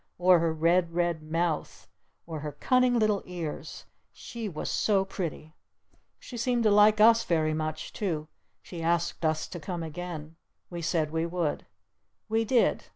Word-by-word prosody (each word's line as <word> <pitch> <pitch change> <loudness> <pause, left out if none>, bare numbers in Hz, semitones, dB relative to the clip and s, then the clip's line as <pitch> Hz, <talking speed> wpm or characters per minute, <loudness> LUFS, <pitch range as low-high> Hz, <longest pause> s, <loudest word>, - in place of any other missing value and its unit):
Or 180 0 +5
her 165 0 +1
red, 170 +2 +2
red 175 -2 0
mouth! 160 +1 -2 0.4
Or 160 -2 -6
her 150 0 -5
cunning 250 - +2
little 215 -3 +2
ears! 170 -4 -6 0.3
She 230 -3 -7
was 155 -4 -5
so 195 -3 +2
pretty! 165 -5 -5 0.6
She 245 - -9
seemed 240 0 +1
to 215 - +4
like 210 +1 +6
us 230 +1 +6
very 155 -2 +1
much 155 0 -4
too. 160 -7 -2 0.4
She 170 -2 -8
asked 170 +1 0
us 155 0 0
to 175 - -7
come 170 +2 -5
again. 160 -1 -7 0.3
We 175 -1 -5
said 160 -2 0
we 165 +1 -1
would. 170 -3 -2 0.6
We 225 +1 +1
did. 240 +1 +2
170 Hz, 155 wpm, -28 LUFS, 160-210 Hz, 0.6 s, like